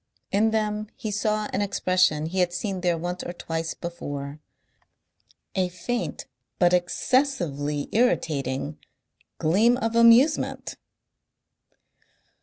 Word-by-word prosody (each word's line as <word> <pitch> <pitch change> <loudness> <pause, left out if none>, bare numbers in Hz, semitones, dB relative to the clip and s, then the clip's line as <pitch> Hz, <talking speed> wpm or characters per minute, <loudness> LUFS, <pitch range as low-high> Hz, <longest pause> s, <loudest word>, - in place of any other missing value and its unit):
In 210 +3 +3
them 215 -1 -1
he 215 - -5
saw 215 0 0
an 200 - 0
expression 185 -6 +2
he 180 +4 -2
had 175 -1 +2
seen 190 0 -3
there 175 -2 +1
once 175 +2 -4
or 175 - -5
twice 165 -1 -4
before, 145 -4 -6 1.1
a 185 -2 0
faint 230 +8 -4 0.3
but 175 -1 +4
excessively 175 - 0
irritating 150 - 0 0.6
gleam 215 +10 +3
of 225 -2 -2
amusement. 235 +6 +4
185 Hz, 105 wpm, -25 LUFS, 165-220 Hz, 1.1 s, but